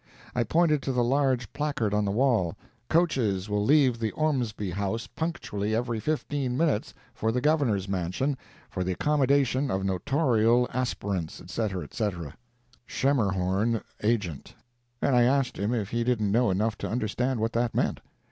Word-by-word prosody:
I 125 - +1
pointed 155 +3 +2
to 135 - -2
the 125 -1 +1
large 130 -2 +1
placard 140 -8 -1
on 105 0 +2
the - - 0
wall: 110 -7 +2 0.3
"Coaches 120 - +1
will 105 0 0
leave 130 -2 +4
the 110 -1 0
Ormsby 125 - -1
House 100 +5 -2
punctually 110 -11 -3
every 120 -1 -1
fifteen 140 -2 -2
minutes, 155 -9 +1 0.2
for 110 - -1
the 125 - 0
Governor's 130 -9 +1
mansion, 95 +9 -1 0.3
for 90 - -3
the 90 0 -1
accommodation 140 +1 +2
of 95 -1 -1
Notorial 120 - +2
aspirants, 100 -9 -2
etc., 95 0 -3
etc.—Schemerhorn, 110 - -2 0.2
Agent"—and 120 - -3
I 120 - +5
asked 130 +2 +2
him 100 +3 0
if 110 -4 -2
he 115 0 0
didn't 115 -5 +1
know 120 +2 +3
enough 105 +3 0
to - - -3
understand 125 +2 -1
what 115 +2 -1
that 120 0 0
meant? - - 0
120 Hz, 145 wpm, -27 LUFS, 105-135 Hz, 0.3 s, I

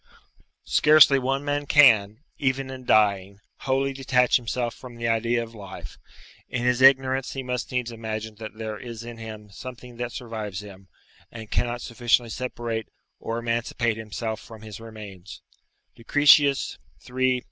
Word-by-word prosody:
["Scarcely 150 -3 +6
one 135 +2 -1
man 145 0 -1
can, 110 -7 +5 0.2
even 130 -1 -1
in 130 -1 -9
dying, 100 -3 +2 0.2
wholly 135 +1 0
detach 130 -2 +3
himself 120 -1 -3
from 125 -2 -12
the 115 0 -3
idea 115 +1 +1
of 115 0 -11
life; 100 -4 -10 0.5
in 125 -1 -2
his 125 0 +2
ignorance 135 0 +4
he 135 - -4
must 125 -1 -4
needs 125 -2 -2
imagine 110 -1 -5
that 110 -1 -8
there 110 -1 -5
is 115 -2 -8
in 120 0 -9
him 110 -2 -9
something 125 +2 -10
that 120 0 -4
survives 110 -7 -6
him, 95 -2 -13 0.4
and 110 -2 -10
cannot 120 0 -1
sufficiently 120 -1 +1
separate 120 -3 -4 0.3
or 115 - -4
emancipate 115 0 -1
himself 110 0 -4
from 110 -2 -13
his 110 -1 -9
remains" 105 -4 -11 0.5
Lucretius, 145 +3 +4 0.3
iii. 130 0 +1
120 Hz, 145 wpm, -25 LUFS, 110-130 Hz, 0.5 s, Scarcely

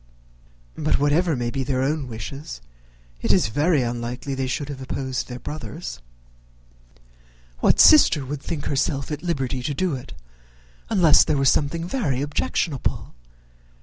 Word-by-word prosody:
But, 155 - +1
whatever 150 +4 +2
may 120 -1 -2
be 135 0 -2
their 130 -1 0
own 145 0 -1
wishes, 120 - -7 0.6
it - - +1
is - - +3
very 145 +4 +2
unlikely 120 +3 -4
they 135 -1 -2
should 140 +2 -3
have 135 -2 -7
opposed 130 0 -3
their 125 - -6
brother's. 110 - -7 1.6
What - - +3
sister 185 - +7
would 140 +1 -5
think 155 -3 -5
herself 140 0 -1
at 150 -1 -4
liberty 135 -7 -2
to 140 +3 -3
do 185 +1 0
it, 125 - -9 0.8
unless 175 -8 +6
there 150 - 0
were 135 - +1
something 165 +5 +1
very 145 - -1
objectionable? 145 -1 -2
140 Hz, 145 wpm, -23 LUFS, 130-155 Hz, 1.6 s, sister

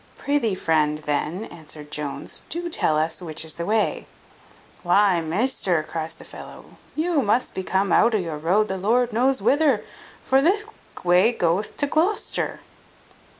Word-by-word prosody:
"Prithee, 280 -8 0
friend, 155 -4 +1
then," 150 +6 -2
answered 155 -2 -11
Jones, 150 -2 -4
"do 345 +2 -3
tell 155 - +1
us 160 +3 0
which 160 -2 -4
is 160 - -2
the 170 - -5
way." 215 +1 0 0.7
"Why, 185 0 +3
measter," 180 -1 0
cries 160 +1 -5
the - - -14
fellow, - - -12 0.2
"you 320 -1 +1
must 235 +2 +1
be - - -3
come 190 +1 0
out 230 0 +4
of 210 - +1
your 160 -4 -5
road 190 +7 +2
the 190 - -3
Lord 235 +4 +2
knows 260 +4 +2
whither; 285 -6 +3 0.4
for 265 +1 +3
thick 400 +8 +2 0.4
way 180 +6 +5
goeth 180 -1 -1
to 290 - +1
Glocester." 325 +9 -1
195 Hz, 155 wpm, -23 LUFS, 160-255 Hz, 0.7 s, way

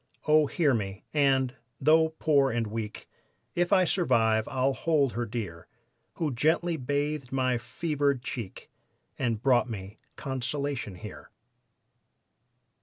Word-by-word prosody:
"Oh, 155 -1 +5
hear 150 -4 +2
me, 100 -3 -3
and, 135 -3 +3 0.3
though 160 +2 +4
poor 140 -3 +3
and 115 -2 -1
weak, 110 0 -5 0.5
If 175 +1 0
I 185 -2 +5
survive 110 - +2
I'll 135 +1 +1
hold 145 -3 +1
her 120 0 -2
dear, 100 -8 -5 0.5
Who 155 -5 -2
gently 165 +6 +1
bathed 145 0 -2
my 130 -2 +1
fevered 140 0 -1
cheek 120 -6 -7 0.5
And 115 -2 -1
brought 125 -2 +3
me 100 -1 -7 0.2
consolation 135 -4 -3
here." 90 - -10
130 Hz, 120 wpm, -28 LUFS, 115-150 Hz, 0.5 s, Oh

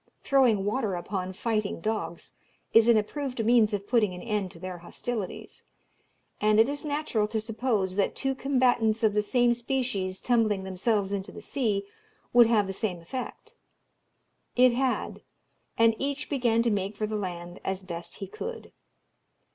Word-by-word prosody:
Throwing 245 -8 +3
water 210 -2 0
upon 185 +1 -3
fighting 215 0 -2
dogs 215 -3 -3 0.4
is 225 0 +7
an 235 -2 +6
approved 250 +2 -2
means 230 -2 +5
of 200 -1 -3
putting 210 -5 +2
an 180 - -8
end 210 -4 -1
to 170 - -13
their 180 0 -6
hostilities; 205 +3 -5 0.8
and 215 0 +4
it 225 - +6
is 285 +1 -3
natural 290 -8 0
to 220 +1 -2
suppose 215 -4 -1
that 200 - +1
two 270 -1 -1
combatants 245 -5 +2
of 215 -2 +4
the 210 - +3
same 240 +3 +3
species 240 -6 -2
tumbling 220 -5 +1
themselves 195 +2 0
into 195 -1 -3
the - - -9
sea 215 -8 -1 0.5
would 240 -1 +8
have 220 -3 +3
the 195 - -4
same 190 -3 -2
effect. 245 +10 -7 1.0
It 250 0 +6
had; 260 +1 -1 0.6
and 230 0 +5
each 285 +2 -3
began 235 -4 +2
to 235 - +2
make 200 0 -1
for 215 - -1
the 215 0 -3
land 175 -3 -5
as 190 0 -2
best 170 -1 -6
he 195 - -6
could. 460 - -7
215 Hz, 165 wpm, -28 LUFS, 195-245 Hz, 1.0 s, would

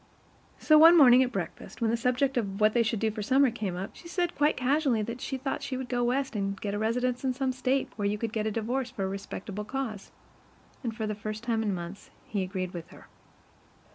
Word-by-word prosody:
So 310 -1 +5
one 330 +2 +9
morning 255 -4 +8
at 255 -1 +1
breakfast, 195 -7 -6
when 230 -2 +1
the - - +2
subject 250 +3 +1
of 200 -5 -2
what 215 0 +4
they 240 - +3
should 225 -1 0
do 220 +1 +1
for 215 - -15
the - - -3
summer 265 +3 +4
came 210 -6 -3
up, 185 +2 -5
she 340 - -12
said 350 0 -1
quite 295 +1 +2
casually 255 -3 +2
that 235 +3 -6
she 265 - -3
thought 270 +1 -3
she 260 - -3
would 255 -1 -5
go 245 -1 0
West 260 0 0
and 195 -1 -2
get 200 -1 -3
a 205 - -2
residence 245 +3 0
in 260 -1 +1
some 265 0 -1
State 260 +1 0
where 205 -2 0
you 210 +1 0
could 225 +1 -4
get 215 -1 -1
a - - 0
divorce 235 +4 -2
for 220 -5 -5
a - - 0
respectable 195 +1 -5
cause; 225 -3 -5 0.7
and 230 -3 -3
for 220 - -2
the 215 - -2
first 215 +1 -6
time 230 -2 0
in 215 -2 0
months 180 +2 -6 0.2
he 205 -3 -2
agreed 185 -1 -3
with 170 -2 -7
her. - - -16
230 Hz, 245 wpm, -28 LUFS, 205-260 Hz, 0.7 s, one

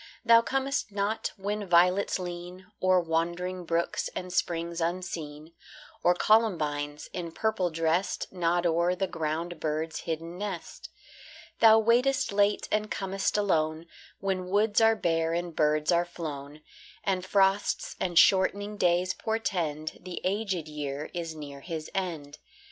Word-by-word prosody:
Thou 230 0 +7
comest 270 0 -1
not 200 +2 -1
when 205 +1 -3
violets 180 +3 +4
lean 180 0 -7 0.2
O'er 185 0 +4
wandering 175 +2 -2
brooks 170 +1 -1
and 180 -1 -5
springs 170 -1 -1
unseen, 165 -3 -4 0.5
Or 175 - +4
columbines, 150 -9 +1
in 170 -2 -4
purple 220 -1 0
dressed, 165 +5 -1
Nod 175 -1 +1
o'er 170 +2 +2
the 195 +1 0
ground 165 0 -3
bird's 155 +1 -2
hidden 165 +2 -5
nest. 200 -5 -6 0.7
Thou 220 -1 +8
waitest 240 +4 +2
late 205 +1 +2
and 215 0 0
com'st 195 +1 -1
alone, 160 -5 +1 0.3
When 185 -2 -2
woods 210 +3 +3
are 225 0 +5
bare 165 -4 0
and 170 -1 -3
birds 150 +1 +2
are 170 0 +4
flown, 150 -4 -7 0.4
And 185 -2 0
frosts 195 +1 +1
and 175 -3 -1
shortening 200 +3 +4
days 180 0 +2
portend 170 -9 -2
The 180 -1 -6
aged 190 -4 -1
year 150 -1 -5
is 165 -2 -4
near 145 -2 -8
his 160 +1 -6
end. 160 -6 -4
175 Hz, 135 wpm, -28 LUFS, 160-195 Hz, 0.7 s, Thou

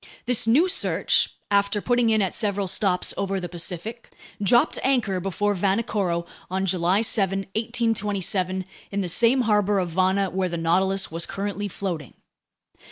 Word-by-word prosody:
This 245 -2 +2
new 285 +11 +5
Search, 370 - +2 0.2
after 200 +1 +2
putting 240 +1 +2
in 220 -2 +3
at 190 - -2
several 200 -2 -1
stops 185 -1 0
over 195 0 -1
the 180 - -5
Pacific, 180 +6 -6 0.3
dropped 240 +4 +3
anchor 240 -8 +1
before 195 +3 -1
Vanikoro 195 -3 0 0.2
on 190 +1 -1
July 185 +3 +1
7, 195 -3 +1
1827, 200 -4 -1 0.2
in 200 0 -2
the 185 - -2
same 235 +8 +4
harbor 210 -3 +2
of 180 -2 0
Vana 190 +2 +1
where 185 -1 -1
the 170 - -3
Nautilus 190 +4 +1
was 165 +1 -4
currently 205 +1 -3
floating. 175 -8 -5
195 Hz, 150 wpm, -24 LUFS, 185-215 Hz, 0.3 s, new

